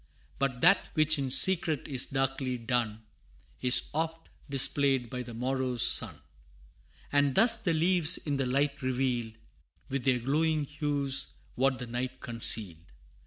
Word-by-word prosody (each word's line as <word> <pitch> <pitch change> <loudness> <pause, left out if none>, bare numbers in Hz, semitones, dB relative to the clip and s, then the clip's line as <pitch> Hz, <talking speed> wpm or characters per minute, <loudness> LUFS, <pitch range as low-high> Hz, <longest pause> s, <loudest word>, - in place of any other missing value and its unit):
But 130 -3 -2
that 180 +4 +3
which 155 -1 +2
in 135 -1 -3
secret 160 0 +2
is 135 -4 +1
darkly 135 -1 -2
done, 115 -2 -3 0.6
Is 125 0 +5
oft 165 +1 -4 0.2
displayed 135 -2 0
by 125 - -5
the 120 -2 -10
morrow's 130 0 -1
sun; - - +2 0.9
And 145 -2 +1
thus 230 +1 +5
the 195 -7 -2
leaves 170 +1 +2
in 145 -2 -4
the 135 -2 -2
light 140 +3 -1
revealed, 125 -3 -2 0.6
With 135 -1 -4
their 130 -2 +2
glowing 150 +4 -1
hues 145 -2 -2 0.2
what 130 +1 0
the 125 - -7
night 120 +2 -5
concealed. 105 -7 +1
135 Hz, 140 wpm, -28 LUFS, 125-150 Hz, 0.9 s, Is